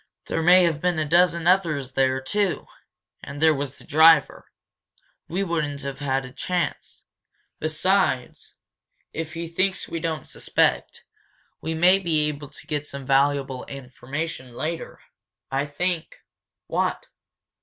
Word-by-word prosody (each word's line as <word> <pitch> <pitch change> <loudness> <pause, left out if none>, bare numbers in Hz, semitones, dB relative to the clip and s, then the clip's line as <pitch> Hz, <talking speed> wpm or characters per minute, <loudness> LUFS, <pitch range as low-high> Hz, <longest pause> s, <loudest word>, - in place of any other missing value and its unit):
There 165 - -1
may 180 +3 +7
have 160 -3 +1
been 180 -1 +1
a 155 - 0
dozen 170 +1 +3
others 165 -8 +2
there, 130 0 +2
too. 200 +7 -1 0.6
And 140 +1 -7
there 160 0 +5
was 140 -2 -4
the - - -16
driver. 160 +2 +4 0.8
We 185 +4 -1
wouldn't 150 -6 -2
have 140 -1 -5
had 135 -2 -1
a 130 - -10
chance. 180 +6 -3 0.6
Besides, 155 -3 0 0.6
if 160 0 -5
he 170 0 -4
thinks 185 +3 -1
we 165 - -4
don't 160 -3 -3
suspect, - - 0 0.6
we 160 +1 -3
may 180 +4 +5
be 160 -5 +1
able 145 -1 -7
to 130 - -11
get 150 -1 -3
some 140 -1 -7
valuable 135 -1 +1
information 130 0 -6
later. 165 +4 -4 0.5
I 135 +2 0
think 170 +3 -2 0.3
" - - -66
"What?" - - -1
155 Hz, 140 wpm, -24 LUFS, 140-170 Hz, 0.8 s, may